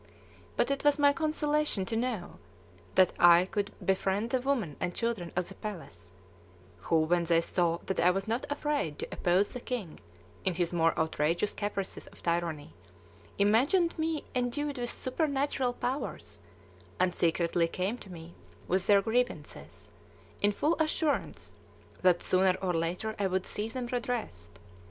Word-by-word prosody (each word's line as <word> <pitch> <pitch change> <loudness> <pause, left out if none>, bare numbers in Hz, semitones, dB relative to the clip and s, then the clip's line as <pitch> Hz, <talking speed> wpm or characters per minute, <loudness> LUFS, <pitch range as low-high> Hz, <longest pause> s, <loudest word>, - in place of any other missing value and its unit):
But - - +2
it 275 - -1
was 290 0 +4
my 285 -1 +5
consolation 300 - 0
to 225 - -3
know 230 -6 -3 0.6
that 185 -2 +5
I 175 +1 +7
could 205 +1 -2
befriend 195 +4 0
the 260 - +1
women 245 - -1
and 175 - -2
children 225 -8 -2
of 180 0 0
the - - -6
palace, 195 - -8 0.7
who, 165 -1 +1
when 170 +2 +2
they 165 0 +4
saw 170 0 +1
that 190 - -2
I 175 - +5
was 195 +2 -1
not 230 +3 -1
afraid 290 - -1
to - - -4
oppose 180 +3 +2
the 250 - -6
king 235 -10 -5 0.4
in 185 -2 0
his 175 0 -1
more 165 -1 +2
outrageous 160 +5 0
caprices 205 -2 -4
of - - -16
tyranny, 170 - -2 0.6
imagined 265 - +3
me 315 -1 -1
endued 265 +3 -1
with 240 0 -2
supernatural 270 -2 -1
powers, 250 +3 -4 0.6
and 180 -1 +2
secretly 170 0 +1
came 190 +8 -2
to 195 - -12
me 165 0 -10 0.3
with 185 +1 +1
their 200 -1 +5
grievances, 245 +3 -3 0.5
in 205 - +4
full 300 +11 +1
assurance 310 -1 -1 0.5
that 180 -2 +4
sooner 185 0 +3
or 185 -2 -1
later 175 +6 -1
I 200 - +2
would 185 0 -1
see 210 +1 -3
them 245 +2 -4
redressed. 235 - -4
200 Hz, 155 wpm, -30 LUFS, 175-250 Hz, 0.7 s, I